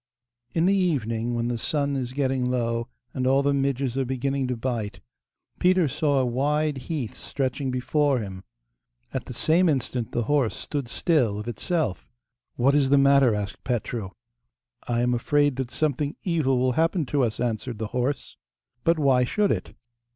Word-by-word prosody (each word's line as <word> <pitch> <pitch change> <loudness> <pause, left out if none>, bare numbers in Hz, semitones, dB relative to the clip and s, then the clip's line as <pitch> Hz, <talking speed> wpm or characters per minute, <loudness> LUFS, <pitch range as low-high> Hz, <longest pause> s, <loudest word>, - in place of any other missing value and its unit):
In 165 0 +3
the 195 - +4
evening, 120 - 0
when 120 0 -1
the 120 -1 -2
sun 140 +2 -1
is 125 -2 -2
getting 135 -2 0
low, 115 -2 0 0.3
and 130 -1 -1
all 135 +1 +4
the 140 0 +2
midges 135 -2 0
are - - +2
beginning 130 +1 -1
to 125 -1 -2
bite, 115 -5 -3 0.6
Peter 180 -2 +4
saw 145 +1 +1
a 130 - +3
wide 145 +4 0
heath 145 -9 -2
stretching 135 0 -2
before 135 +2 +1
him. 95 -4 -6 0.7
At 130 - -3
the 125 - -7
same 165 +7 +3
instant 125 -4 -1
the 120 - 0
horse 135 -1 +1
stood 140 -4 -4
still 125 -7 +1
of 105 +2 -6
itself. 125 - -2 0.5
'What 135 +3 +3
is 140 -2 +3
the 140 - +5
matter?' 140 -4 +5
asked 100 -1 -5
Petru. 115 -4 -2 0.8
'I 120 -1 +1
am 125 0 +2
afraid 145 +3 +2
that 130 -2 -2
something 145 0 -1
evil 155 -8 +1
will 130 +1 +2
happen 165 +4 +1
to 140 +2 0
us,' 115 -4 0
answered 120 0 -2
the 110 0 -4
horse. 125 +3 -2 0.5
'But 165 0 +3
why 135 -4 +4
should 205 +11 +1
it? - - -3
130 Hz, 175 wpm, -25 LUFS, 120-145 Hz, 0.8 s, the